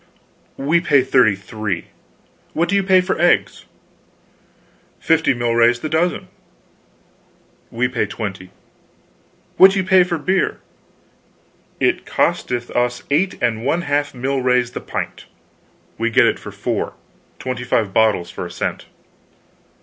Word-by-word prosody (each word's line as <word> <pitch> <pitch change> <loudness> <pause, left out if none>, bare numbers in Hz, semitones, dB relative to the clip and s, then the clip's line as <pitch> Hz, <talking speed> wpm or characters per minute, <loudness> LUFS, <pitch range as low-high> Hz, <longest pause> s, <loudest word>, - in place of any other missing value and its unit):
"We 155 +5 +1
pay 140 -6 +3
thirty 125 -5 +3
three. 100 -2 -5 0.6
What 170 +2 0
do 200 - +1
you 200 - +3
pay 190 -1 +4
for 185 -3 -2
eggs?" 175 - +2 1.3
"Fifty 160 -1 +2
milrays 120 -1 +2
the 155 - -3
dozen." 170 +3 0 1.4
"We 120 +2 0
pay 125 -1 -2
twenty. 95 -4 -6 1.1
What 190 - +9
do - - -2
you 190 - +1
pay 185 -1 +5
for 175 -1 -2
beer?" 185 +5 0 1.2
"It - - 0
costeth 120 -1 -1
us 120 0 -1
eight 180 +7 +1
and 115 -2 0
one 165 +6 0
half 145 -1 0
milrays 125 -1 0
the - - -6
pint." - - -6 0.7
"We 115 +1 +1
get 115 - +4
it - - +1
for - - -9
four; - - -3 0.4
twenty 125 -1 -5
five 110 -5 0
bottles 110 -6 +2
for - - -6
a - - -6
cent. - - -4
125 Hz, 135 wpm, -19 LUFS, 115-170 Hz, 1.4 s, What